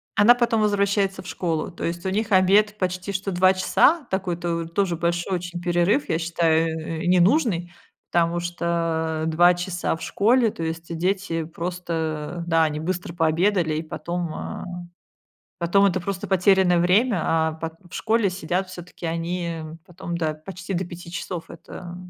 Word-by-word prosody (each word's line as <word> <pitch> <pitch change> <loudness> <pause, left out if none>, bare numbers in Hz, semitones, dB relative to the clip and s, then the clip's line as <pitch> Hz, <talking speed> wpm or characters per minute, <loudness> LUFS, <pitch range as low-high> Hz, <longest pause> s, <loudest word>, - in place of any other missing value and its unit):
Она 230 +4 +7
потом 235 -2 +1
возвращается 200 -1 +1
в - - -12
школу, 165 -3 -2
то - - -8
есть 170 +1 -3
у - - +1
них 210 +2 -1
обед 205 +3 +4
почти 185 +1 -2
что 195 +1 -2
2 185 +1 +4
часа, 285 - +3
такой 190 -2 -1
то 170 -1 -2
тоже 175 +1 0
большой 175 +2 -1
очень 175 0 -6
перерыв, 175 +10 +1
я 160 - +2
считаю, 165 -1 +1 0.3
э, - - -4
ненужный, 180 - +3 0.4
потому 170 0 +2
что 165 -2 -1
2 175 +2 +5
часа 175 -1 -2
в - - -12
школе, 230 +2 +3
то 165 - -6
есть 165 +1 -4
дети 180 -2 -1
просто, 165 -1 -4
да, 165 -1 +4
они 150 -1 -1
быстро 175 0 -3
пообедали, 165 0 +2
и 155 - -2
потом, 170 +1 -4
а, - - -6 0.9
потом 185 +4 +3
это 185 -1 +2
просто 195 +2 -4
потерянное 190 -1 +4
время, 190 +3 +3
а 160 -1 +1
пот 160 0 -6 0.2
в - - -11
школе 225 -2 +1
сидят 180 +1 -2
всё-таки 180 -1 -8
они 170 0 -2 0.3
потом 175 -1 -6
до, 155 -2 -1
почти 185 +4 -8
до 185 +2 -1
5 175 0 -10
часов, 175 -1 -5
это 175 0 -9
175 Hz, 165 wpm, -24 LUFS, 165-190 Hz, 0.9 s, Она